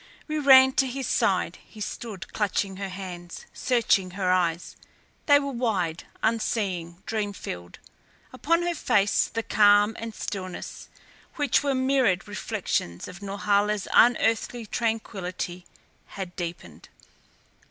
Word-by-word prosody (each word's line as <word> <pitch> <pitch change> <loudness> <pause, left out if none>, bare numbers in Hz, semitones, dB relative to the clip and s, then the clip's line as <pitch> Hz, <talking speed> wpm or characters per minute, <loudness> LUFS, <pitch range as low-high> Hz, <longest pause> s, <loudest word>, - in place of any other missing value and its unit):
We 310 -1 -1
ran 265 -2 +8
to 270 - +4
his 260 +1 -4
side. - - +1
He 215 - -16
stood 205 -3 -6
clutching 200 -2 -1
her 195 0 -4
hands, 180 -2 -8
searching 230 -7 +2
her 185 -2 +1
eyes. 175 -2 0 0.5
They 285 -1 +8
were 280 -1 -3
wide, 200 -10 -1 0.2
unseeing, 195 -6 -1
dream 210 -2 -2
filled. 90 - -8 0.6
Upon 335 +6 +1
her 345 0 0
face 210 -10 +2
the 230 - -3
calm 205 0 +4
and 225 -1 -6
stillness, 185 -3 -6 0.5
which 290 -4 +2
were 280 -1 0
mirrored 260 -8 +2
reflections 205 - -3
of 180 +1 -10
Norhala's 205 +1 0
unearthly 235 0 +3
tranquillity, 190 -6 -3 0.4
had 185 -3 -7
deepened. 165 - -7
205 Hz, 120 wpm, -26 LUFS, 185-240 Hz, 0.6 s, ran